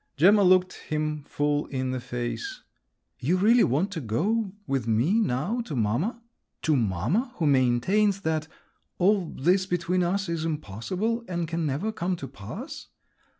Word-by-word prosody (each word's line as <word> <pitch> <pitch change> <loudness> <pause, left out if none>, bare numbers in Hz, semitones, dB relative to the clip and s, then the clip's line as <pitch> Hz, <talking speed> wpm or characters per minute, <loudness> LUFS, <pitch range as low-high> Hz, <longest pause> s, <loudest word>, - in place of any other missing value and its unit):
Gemma 200 +8 +6
looked 185 -1 +4 0.2
him 150 -1 -1
full 145 0 0
in 130 -1 -2
the 130 - -2
face. 125 - -5 0.6
"You 165 +9 +1
really 225 +5 +5
want 155 - +1
to 165 -5 -4
go 195 - 0
with 135 -6 -1
me 125 - +3
now 200 - 0
to 150 - -5
mamma? 140 - -1 0.4
to 155 - +3
mamma, 125 - 0
who 165 - -1
maintains 145 - +3
that… 160 -2 -1 0.5
all 190 -1 +3
this 185 +6 +1
between 180 0 0
us 190 +2 0
is 165 -1 -2
impossible—and 175 - -2
can 165 -1 -1
never 150 +11 -1
come 185 -3 -2
to 140 -5 -7
pass?" 190 - -8
170 Hz, 150 wpm, -26 LUFS, 135-195 Hz, 0.6 s, Gemma